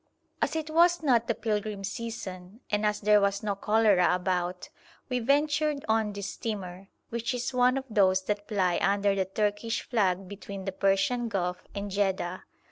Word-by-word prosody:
As - - 0
it 315 -1 -3
was 340 +1 +4
not 240 -5 +3
the 230 - 0
pilgrim 210 -2 -2
season, 200 -1 -6
and 210 0 +2
as 210 0 -1
there 210 0 +5
was 200 0 0
no 205 -1 0
cholera 205 -3 +3
about, 180 -1 -2 0.4
we 250 -1 0
ventured 290 +3 +1
on 220 -1 +2
this 200 -1 -5
steamer, 195 -4 -5 0.2
which 235 +2 -2
is 245 +2 -3
one 250 +1 +3
of 270 - -4
those 190 -4 +3
that 205 +1 -3
ply 185 -5 +1
under 200 0 +2
the 195 -1 0
Turkish 210 +3 -1
flag 195 -5 +1
between 200 0 -8
the 195 - -2
Persian 195 +5 +1
Gulf 180 -3 -2
and 200 0 -4
Jedda. 190 -2 -1
205 Hz, 170 wpm, -28 LUFS, 195-230 Hz, 0.4 s, there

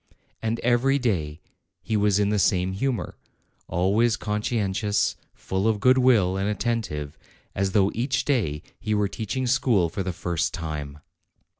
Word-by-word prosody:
And 115 +1 -1
every 125 +3 +3
day 85 - -1 0.4
he 110 - -1
was 105 -1 +3
in 100 -1 +2
the 105 0 +1
same 95 -1 +2
humor, 120 +3 -2 0.5
always 105 +7 +2
conscientious, 105 -1 0 0.2
full 95 +3 -2
of 110 -2 +1
good 130 +5 +5
will, 105 -8 +4
and 100 +2 0
attentive, 105 -10 -3 0.3
as 95 -1 -1
though 100 -1 +3
each 125 +3 -1
day 100 - 0 0.2
he 110 0 -1
were 105 -1 +2
teaching 115 +6 -3
school 120 -8 +2
for 100 +4 -4
the 95 0 -2
first 85 -1 -2
time. 75 -4 -5
105 Hz, 150 wpm, -25 LUFS, 95-115 Hz, 0.5 s, good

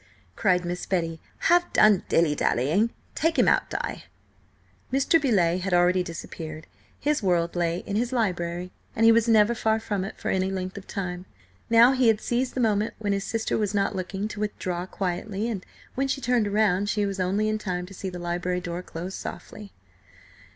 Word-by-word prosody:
cried 180 -1 +2
Miss 175 +1 -4
Betty. 165 -3 -1 0.2
"Have 350 +1 +3
done 215 -3 +5
dilly 165 -3 +3
dallying! 150 - +1 0.2
Take 325 +2 0
him - - +4
out, - - +3
Di!" - - -4 0.9
Mr. 275 +5 +3
Beauleigh 185 - +2
had 185 0 0
already 180 +1 +4
disappeared. 160 -2 -7 0.3
His 295 -1 0
world 175 -3 +1
lay 170 0 0
in 200 - -3
his 240 +2 0
library, 180 -6 -1 0.2
and 225 - +3
he 230 - +8
was 230 0 +3
never 220 0 +5
far 220 -1 +1
from 205 -3 -2
it 195 - -7
for - - -2
any 190 0 +1
length 185 -1 -4
of 200 - -9
time. 180 -2 -5 0.4
Now 230 +2 +7
he 255 -2 +3
had 220 -2 +4
seized 245 +3 -1
the - - -1
moment 215 -2 +1
when 205 -2 -1
his 195 0 -2
sister 225 -1 -1
was 210 -1 -1
not 200 -1 +1
looking 190 +2 -3
to 210 - -7
withdraw 185 -4 -3
quietly, 195 +3 -3
and, 210 -6 -3 0.3
when 270 +1 0
she 270 - -1
turned 240 -5 +1
round, 205 -1 +2
she 210 -1 +1
was 195 -1 -3
only 195 +4 +1
in 215 0 0
time 180 -3 -3
to 190 - -12
see 190 0 -5
the 180 - -7
library 175 +1 -2
door 175 -1 -5
close 180 +1 -7
softly. 205 0 -8
195 Hz, 195 wpm, -26 LUFS, 180-220 Hz, 0.9 s, he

